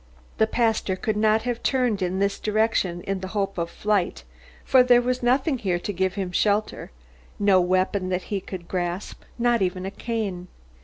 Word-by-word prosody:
The 220 Hz, -, +4 dB
pastor 220 Hz, -4 st, +1 dB
could 215 Hz, +3 st, -2 dB
not 215 Hz, +1 st, +2 dB
have 240 Hz, -1 st, -3 dB
turned 250 Hz, -7 st, +1 dB
in 180 Hz, 0 st, -1 dB
this 200 Hz, 0 st, 0 dB
direction 210 Hz, -5 st, 0 dB
in 195 Hz, +1 st, -3 dB
the 190 Hz, -, -5 dB
hope 195 Hz, -2 st, -1 dB
of 170 Hz, 0 st, -2 dB
flight, 205 Hz, -1 st, -1 dB, 0.4 s
for 260 Hz, -, +6 dB
there 250 Hz, -1 st, +6 dB
was 250 Hz, +1 st, -1 dB
nothing 260 Hz, +3 st, +2 dB
here 185 Hz, -5 st, 0 dB
to 205 Hz, +4 st, -4 dB
give 190 Hz, +1 st, -1 dB
him 190 Hz, -3 st, -3 dB
shelter, 210 Hz, +3 st, 0 dB, 0.5 s
no 200 Hz, -2 st, +4 dB
weapon 185 Hz, +1 st, +1 dB
that 180 Hz, 0 st, -1 dB
he 195 Hz, -, -1 dB
could 180 Hz, -2 st, -8 dB
grasp, 175 Hz, +1 st, -3 dB, 0.2 s
not 240 Hz, -2 st, +2 dB
even 185 Hz, 0 st, -1 dB
a 195 Hz, -, -4 dB
cane. 205 Hz, -6 st, -4 dB
200 Hz, 185 wpm, -24 LUFS, 185-225 Hz, 0.5 s, for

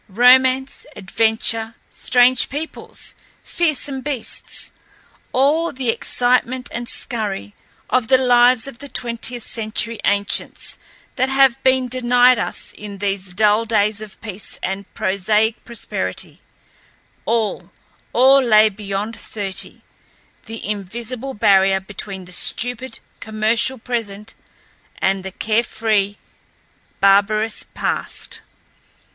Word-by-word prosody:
Romance, 255 Hz, +5 st, +4 dB
adventure, 225 Hz, +3 st, +1 dB, 0.2 s
strange 250 Hz, 0 st, +3 dB
peoples, 305 Hz, +3 st, -6 dB, 0.3 s
fearsome 290 Hz, -5 st, -1 dB
beasts—all 285 Hz, +3 st, -3 dB
the 260 Hz, -3 st, -3 dB
excitement 250 Hz, +2 st, 0 dB
and 235 Hz, 0 st, -5 dB
scurry 205 Hz, -, -4 dB, 0.3 s
of 255 Hz, -3 st, +1 dB
the 260 Hz, -, +5 dB
lives 245 Hz, -1 st, +4 dB
of 255 Hz, -4 st, -10 dB
the 285 Hz, -, -9 dB
twentieth 240 Hz, -1 st, -2 dB
century 225 Hz, 0 st, -1 dB
ancients 200 Hz, 0 st, 0 dB, 0.4 s
that 260 Hz, +1 st, +1 dB
have 270 Hz, -1 st, +3 dB
been 260 Hz, -1 st, +2 dB
denied 245 Hz, -1 st, +4 dB
us -, -, -4 dB
in 205 Hz, -1 st, -8 dB
these 195 Hz, -2 st, -3 dB
dull 210 Hz, +2 st, +3 dB
days 215 Hz, -1 st, +1 dB
of 210 Hz, -2 st, -10 dB
peace 210 Hz, -2 st, -6 dB
and 195 Hz, +1 st, -4 dB
prosaic 210 Hz, +4 st, +1 dB
prosperity—all, 220 Hz, -, -5 dB, 0.4 s
all 265 Hz, +2 st, +6 dB
lay 215 Hz, -2 st, +5 dB
beyond 205 Hz, +2 st, -4 dB
thirty, 200 Hz, -3 st, -4 dB, 0.6 s
the 225 Hz, 0 st, -7 dB
invisible 230 Hz, +6 st, -4 dB
barrier 195 Hz, -2 st, +4 dB
between 190 Hz, -1 st, -7 dB
the 180 Hz, -, -12 dB
stupid, 245 Hz, +6 st, -1 dB, 0.2 s
commercial 220 Hz, +4 st, +2 dB
present 225 Hz, -3 st, -4 dB, 0.6 s
and 190 Hz, 0 st, 0 dB
the 190 Hz, -, -5 dB
carefree, 215 Hz, -1 st, 0 dB, 0.8 s
barbarous 205 Hz, +3 st, +3 dB
past. -, -, -2 dB
225 Hz, 100 wpm, -19 LUFS, 205-250 Hz, 0.8 s, all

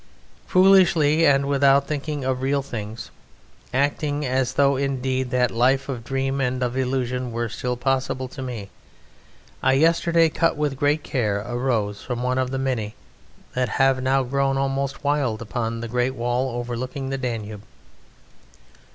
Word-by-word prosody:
Foolishly 180 Hz, -5 st, +5 dB
and 140 Hz, -1 st, +4 dB
without 140 Hz, 0 st, +4 dB
thinking 145 Hz, -1 st, -3 dB
of 130 Hz, -1 st, -1 dB
real 140 Hz, +1 st, 0 dB
things, 110 Hz, -4 st, -7 dB, 0.6 s
acting 145 Hz, +2 st, 0 dB
as 130 Hz, 0 st, 0 dB
though 140 Hz, 0 st, +3 dB
indeed 130 Hz, -1 st, -1 dB
that 125 Hz, -1 st, +1 dB
life 130 Hz, +4 st, +2 dB
of 125 Hz, -4 st, -5 dB
dream 135 Hz, +2 st, -1 dB
and 125 Hz, 0 st, 0 dB
of 125 Hz, 0 st, -2 dB
illusion 125 Hz, -1 st, -1 dB
were 115 Hz, +1 st, -2 dB
still 125 Hz, +3 st, -3 dB
possible 130 Hz, 0 st, -1 dB
to 135 Hz, +2 st, -9 dB
me, 120 Hz, -6 st, -6 dB, 0.9 s
I 130 Hz, -, +3 dB
yesterday 165 Hz, +3 st, +3 dB
cut 165 Hz, 0 st, +1 dB
with 150 Hz, -2 st, -1 dB
great 145 Hz, +2 st, +1 dB
care 105 Hz, -8 st, -1 dB
a 120 Hz, +3 st, -5 dB
rose, 110 Hz, -4 st, -1 dB
one 125 Hz, +1 st, -1 dB
from 130 Hz, -1 st, +1 dB
the 135 Hz, +1 st, -3 dB
many 125 Hz, -6 st, -2 dB, 0.6 s
that 125 Hz, -2 st, 0 dB
have 135 Hz, +2 st, +2 dB
now 135 Hz, +1 st, +2 dB
grown 135 Hz, +1 st, 0 dB
almost 135 Hz, 0 st, -2 dB
wild 140 Hz, -6 st, 0 dB
upon 115 Hz, 0 st, -3 dB
the 115 Hz, -, -4 dB
great 125 Hz, +2 st, 0 dB
wall 120 Hz, +2 st, -1 dB
overlooking 125 Hz, +3 st, -4 dB
the 135 Hz, -, -2 dB
Danube. 110 Hz, -5 st, -4 dB
130 Hz, 150 wpm, -23 LUFS, 125-140 Hz, 0.9 s, Foolishly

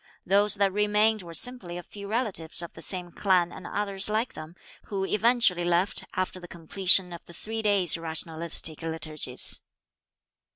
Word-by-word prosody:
Those 200 Hz, +2 st, +3 dB
that 195 Hz, -1 st, 0 dB
remained 210 Hz, +1 st, +1 dB
were 170 Hz, -2 st, -9 dB
simply 200 Hz, -8 st, -1 dB
a 175 Hz, -, -8 dB
few 200 Hz, +2 st, -11 dB
relatives 200 Hz, -8 st, -1 dB
of 170 Hz, -, -10 dB
the -, -, -12 dB
same 180 Hz, -2 st, -6 dB
clan 180 Hz, -3 st, +1 dB
and 185 Hz, -, -10 dB
others 200 Hz, -1 st, -1 dB
like 225 Hz, +4 st, -2 dB
them, 155 Hz, +2 st, -11 dB, 0.3 s
who 195 Hz, -2 st, -4 dB
eventually 210 Hz, -4 st, +1 dB
left 175 Hz, +4 st, -1 dB
after 185 Hz, 0 st, -3 dB
the 175 Hz, -, -11 dB
completion 180 Hz, +2 st, +2 dB
of 170 Hz, -, -10 dB
the 170 Hz, -, -13 dB
three 225 Hz, +6 st, -6 dB
days' 195 Hz, -6 st, +3 dB
rationalistic 160 Hz, -1 st, +3 dB
liturgies. 155 Hz, -5 st, 0 dB
185 Hz, 160 wpm, -26 LUFS, 170-210 Hz, 0.3 s, Those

